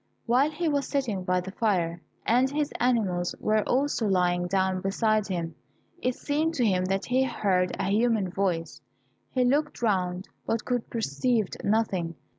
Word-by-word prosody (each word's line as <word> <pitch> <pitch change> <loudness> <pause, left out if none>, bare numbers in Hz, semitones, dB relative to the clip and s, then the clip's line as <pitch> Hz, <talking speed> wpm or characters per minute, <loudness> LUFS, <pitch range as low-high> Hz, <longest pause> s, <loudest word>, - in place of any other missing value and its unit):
While 255 +5 +3
he 325 +2 -2
was 285 -2 0
sitting 235 -10 -1
by 180 -1 +1
the 190 +1 -7
fire, 175 -6 0 0.2
and 250 +3 +3
his 295 +1 -1
animals 200 -8 +1 0.3
also 265 -2 +1
were 205 - +1
lying 175 -1 +2
down 190 0 +1
beside 215 +2 +1
him, 170 -4 -3 0.5
it 255 0 0
seemed 310 +3 -1
to 245 - +2
him 185 -3 +2
that 195 +1 -1
he 255 +1 +2
heard 190 -7 0
a 190 - 0
human 215 -3 +2
voice. 165 -5 -2 0.5
He 255 - +1
looked 290 +4 +1
round, 185 -3 0 0.2
but 225 -1 -1
could 245 -2 -1
perceived 220 - 0
nothing. 195 -6 0
210 Hz, 160 wpm, -27 LUFS, 180-250 Hz, 0.5 s, While